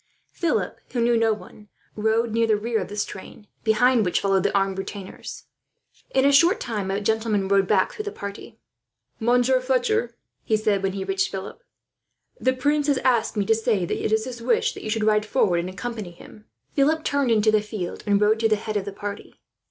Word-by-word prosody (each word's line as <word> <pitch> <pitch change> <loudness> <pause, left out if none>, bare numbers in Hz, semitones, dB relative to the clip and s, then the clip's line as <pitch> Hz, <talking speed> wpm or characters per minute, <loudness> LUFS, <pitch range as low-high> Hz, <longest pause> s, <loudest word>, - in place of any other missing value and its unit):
Philip, 340 -3 -1
who 245 - -1
knew 235 0 +3
no 225 -1 +3
one, 210 0 -8 0.3
rode 220 +2 +1
near 230 0 +2
the 215 -1 +3
rear 225 +2 -1
of - - -4
this 205 0 -2
train, 200 +2 -11 0.2
behind 230 +2 +3
which 180 - +1
followed 195 -1 +2
the 200 - +1
armed 195 -1 0
retainers. 195 0 -7 0.7
In 265 0 +2
a 280 - +5
short 335 +9 +5
time 210 -5 -3
a 195 +1 0
gentleman 215 -2 0
rode 195 -1 +3
back - - +2
through 425 - -6
the 415 - -3
party. 200 - -8 0.6
"Monsieur 245 +2 +3
Fletcher," 245 -2 0 0.3
he 220 - +1
said, 210 -2 +1
when 195 -1 -1
he 195 -1 -3
reached 195 0 0
Philip, 195 - -7 0.8
"the 260 - +2
prince 290 +3 0
has 285 -2 +3
asked 235 -3 +2
me 205 - +1
to 225 - +4
say 215 -4 0
that - - -3
it - - 0
is 220 +1 +2
his 245 -2 -7
wish 240 +2 +1
that - - -9
you - - -5
shall 215 0 0
ride 210 -1 +3
forward, 210 -6 +1
and 175 +2 -3
accompany 215 0 -5
him." 195 +5 -15 0.3
Philip 310 +3 +2
turned 280 -3 +1
into 215 -1 +4
the 215 -1 +3
field, 210 -4 -5
and 200 -1 +3
rode 210 +2 +3
to 225 0 +2
the 215 - +4
head 215 0 -3
of 195 - -3
the 200 - -5
party. 205 0 -7
220 Hz, 215 wpm, -24 LUFS, 200-240 Hz, 0.8 s, a